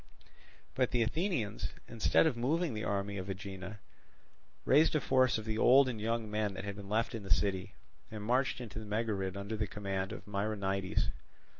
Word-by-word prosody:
But 130 -2 +2
the 120 -1 +2
Athenians, 135 - -1
instead 115 +6 +3
of 155 -6 +2
moving 150 +6 0
the 110 0 -3
army 100 0 -1
of 95 0 -5
Aegina, 95 +1 -6 0.9
raised 155 +2 +5
a - - +4
force 130 -3 +3
of 110 - -6
the 110 0 -2
old 135 +2 +7
and 115 -4 -3
young 115 0 -1
men 105 -1 -1
that 95 - -5
had 100 0 -4
been 100 -1 -9
left 110 +3 +1
in 115 - -4
the 95 - -9
city, 95 +1 +1 0.3
and 110 -1 -6
marched 125 +5 +1
into 115 -3 -6
the 110 - -7
Megarid 105 -3 -1
under 100 +3 -4
the 105 -1 -1
command 95 -2 -3
of - - -7
Myronides. 100 -2 -1
105 Hz, 185 wpm, -33 LUFS, 100-120 Hz, 0.9 s, old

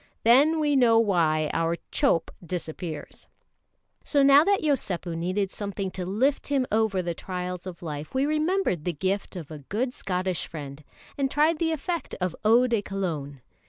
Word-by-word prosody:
Then 285 +8 +5
we 295 -2 +2
know 240 -4 +5
why 165 -8 +2
our 165 +1 0
"chope" 165 - +2
disappears. 165 -2 -6 0.8
So 285 -2 +2
now 280 +2 +7
that 400 +2 +2
Yosépu 195 - -1
needed 185 +4 -1
something 200 -2 -4
to 180 -1 -5
lift 255 +9 +1
him 275 -3 +1
over 215 -4 +1
the 170 0 -2
trials 180 +1 -5
of 175 -1 -8
life, 150 -2 -5
we 265 +1 +2
remembered 310 - 0
the 175 - -1
gift 190 +6 -2
of 165 -4 -7
a 155 - -7
good 225 - -2
Scottish 185 -4 -2
friend, 145 -2 -8 0.4
and 270 -1 +1
tried 305 +3 +2
the 325 -1 +1
effect 330 +2 -3
of 180 -2 -2
eau 230 +4 +5
de 235 -4 +1
Cologne. 160 -9 -4
195 Hz, 165 wpm, -26 LUFS, 170-270 Hz, 0.8 s, now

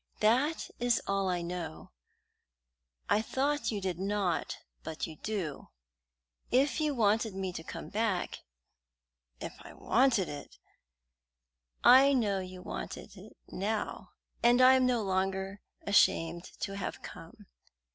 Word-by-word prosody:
That 255 +9 +2
is 240 -1 +2
all 195 -1 0
I 175 -1 -1
know. 170 - -6 1.2
I 210 - +3
thought 285 +6 0
you 210 - -2
did 185 -3 -3
not, 195 -3 -1 0.2
but 160 0 -4
you 160 -2 -9
do. 190 -9 -4 0.8
If 275 +5 +2
you 300 -2 +1
wanted 220 -2 +2
me 190 -1 -3
to 165 - -5
come - - -7
back 210 -4 -1 0.5
" - - -50
"If - - -6
I - - -11
wanted 235 -6 +2
it!" 145 -1 -8 1.3
"I 270 +3 +8
know 210 -7 +1
you 185 -1 -8
wanted - - -7
it - - -14
now, 210 +3 -3 0.3
and 240 +1 +5
I 255 +1 +8
am 260 -1 +4
no 240 -3 +1
longer 190 +1 -1 0.2
ashamed 170 -4 +3 0.2
to 195 - -3
have 200 - -5
come. - - -11
200 Hz, 135 wpm, -31 LUFS, 180-240 Hz, 1.3 s, I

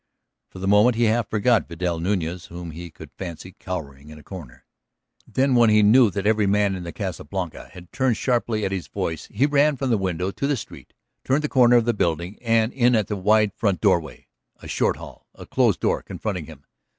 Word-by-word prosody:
For - - -13
the 95 +1 -4
moment 105 +4 +5
he 120 - +1
half 115 -1 +1
forgot 110 +1 +2
Vidal 85 0 -2
Nuñez 90 -1 -2
whom 85 -1 -8
he 85 +2 -8
could 80 -1 -13
fancy 90 0 -7
cowering 75 -6 -7
in 75 - -11
a 75 - -14
corner. 85 -10 -11 0.6
Then 135 0 +1
when 120 -2 +5
he 105 0 +5
knew 115 +3 +6
that 100 +1 -4
every 105 -1 +2
man 100 0 +2
in 90 - -6
the 85 -1 -6
Casa 95 -4 -5
Blanca 90 +1 -6
had 90 -1 -13
turned 130 -4 +1
sharply 120 -4 0
at 95 - -2
his 95 -3 -4
voice 80 -2 -4
he 120 +7 +2
ran 145 0 +3
from 130 -1 -1
the 110 - +2
window 90 0 -2
to 140 - -3
the 145 -2 0
street, 105 - -11 0.3
turned 140 +4 +1
the - - 0
corner 125 -2 +5
of 120 -2 +4
the 120 - +2
building 85 0 -2
and 115 -1 +1
in 125 -2 +3
at 105 -3 0
the 105 - -1
wide 105 +1 +2
front 100 -5 0
doorway. 85 -8 0 0.3
A - - -11
short - - 0
hall, - - -12
a - - -11
closed - - +1
door - - +1
confronting 90 -8 -5
him 75 -3 -13
100 Hz, 220 wpm, -23 LUFS, 85-115 Hz, 0.6 s, knew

